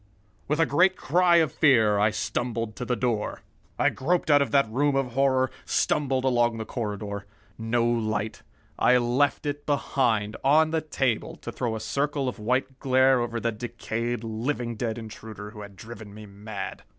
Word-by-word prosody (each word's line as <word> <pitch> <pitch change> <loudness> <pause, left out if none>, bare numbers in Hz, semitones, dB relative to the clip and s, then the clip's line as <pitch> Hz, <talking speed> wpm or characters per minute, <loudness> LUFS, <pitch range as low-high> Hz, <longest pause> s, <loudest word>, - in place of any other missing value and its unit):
With 150 +2 0
a 165 - +5
great 180 +6 +3
cry 175 +3 +3
of 160 -5 +4
fear 110 -10 +4
I 105 +1 +4
stumbled 115 0 -3
to 125 - -4
the 125 - 0
door. 115 -2 -2 0.4
I - - +3
groped 165 +3 0
out 145 0 +6
of 140 - 0
that 140 0 +3
room 140 +5 +1
of 135 -2 0
horror, 130 0 +2
stumbled 135 -3 0
along 120 -3 +2
the 110 - -4
corridor. 105 -3 -5 0.3
No 115 +1 +1
light. 110 -2 -1 0.4
I 125 - +5
left 125 +5 +1
it 145 0 -4
behind, 120 -7 0
on 155 +3 +4
the 160 -1 0
table, 135 -7 -1
to - - -5
throw 115 -3 -2
a - - -4
circle 140 +5 -1
of 125 - -4
white 130 +4 -1
glare 130 0 +4
over 120 -1 -2
the 115 0 -1
decayed, 120 +1 -4
living 115 +2 -3
dead 115 +1 -3
intruder 110 -2 -9
who 105 -1 -10
had 100 -1 -10
driven 105 +1 -10
me 110 0 -10
mad. 100 0 -7
120 Hz, 175 wpm, -26 LUFS, 110-135 Hz, 0.4 s, out